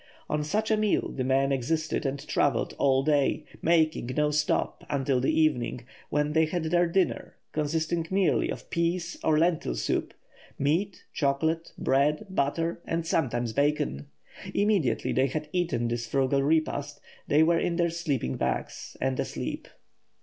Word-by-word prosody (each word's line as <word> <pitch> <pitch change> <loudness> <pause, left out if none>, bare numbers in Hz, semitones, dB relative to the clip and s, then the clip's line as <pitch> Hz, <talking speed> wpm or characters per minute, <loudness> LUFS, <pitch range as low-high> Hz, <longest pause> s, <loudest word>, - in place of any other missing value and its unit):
On 150 0 0
such 215 +8 -1
a 215 - +4
meal 215 -1 +1
the 130 - -3
men 135 +1 +2
existed 155 +3 -1
and 140 +2 -5
travelled 145 - +1
all 135 -1 +3
day, 145 -2 +1 0.2
making 160 -6 +2
no 150 0 +2
stop 150 0 0
until 135 -2 +1
the 130 - +1
evening, 125 -6 +1 0.2
when 150 +1 0
they 160 0 +4
had 170 +1 -2
their 175 +2 +2
dinner, 185 +2 0 0.2
consisting 160 +2 -1
merely 190 -1 +2
of - - -6
pease 170 +1 -1
or 155 -1 +3
lentil 165 - +1
soup, - - -2 0.4
meat, 170 +8 0
chocolate, 160 +3 0
bread, 150 +7 +1
butter, 165 +1 -1
and, 165 0 -2
sometimes, 120 -8 0
bacon. 125 - 0 0.5
Immediately 200 - +1
they 130 +1 +3
had 150 +2 -4
eaten 175 -10 0
this 120 0 -2
frugal 135 +2 +1
repast 145 -1 0 0.3
they 150 +2 +5
were 165 +1 +3
in 175 -1 0
their 170 -1 +1
sleeping 145 - -2
bags - - -3
and 130 -1 -1
asleep. - - -4
150 Hz, 150 wpm, -27 LUFS, 135-170 Hz, 0.5 s, they